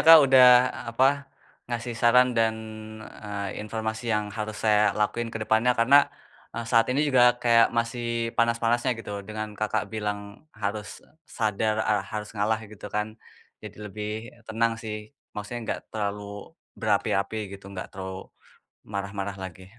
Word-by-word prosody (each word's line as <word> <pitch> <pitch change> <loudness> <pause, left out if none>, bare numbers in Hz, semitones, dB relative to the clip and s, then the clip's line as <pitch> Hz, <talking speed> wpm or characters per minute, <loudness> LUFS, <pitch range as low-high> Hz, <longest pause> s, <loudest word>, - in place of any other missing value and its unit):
Kak, 165 0 +12
udah, 130 -1 +7 0.4
apa, 115 +3 +2 0.6
ngasih 120 0 -3
saran 125 +1 +6
dan, 110 -1 +3 0.7
eee, 100 -1 -4
informasi 110 +1 -4
yang 105 0 +1
harus 105 0 -4
saya 105 -1 +5 0.2
lakuin 115 +2 0
kedepannya. 115 +2 +2
Karena, 140 +5 +6 0.5
eee, 115 - -3
saat 115 -2 +5
ini 130 +3 +1
juga, 125 -2 +5
kayak, 115 -1 +5
masih 115 0 -2
panas-panasnya, 115 +2 +2
gitu, 105 -3 -6
dengan 110 0 -5
Kakak 105 +1 -1
bilang, 105 -1 -2 0.4
"Harus 105 -2 -4 0.3
sadar, 110 -1 +1
ere 105 -1 +3
harus 105 -1 -4
ngalah." 110 +1 0
gitu 105 -1 -10
kan. 105 +1 -2 0.5
Jadi - - -9
lebih 105 +1 -5 0.4
tenang 115 +1 +1
sih, 110 -1 -4 0.4
maksudnya, 110 +4 -5
nggak - - -1
terlalu 105 -1 -3 0.6
berapi-api, 100 +3 +1 0.2
gitu, 100 0 -10
nggak 95 - -6
terlalu 95 0 -7 0.6
marah-marah 100 0 -3
lagi. 95 0 -9
110 Hz, 135 wpm, -26 LUFS, 105-115 Hz, 0.7 s, Kak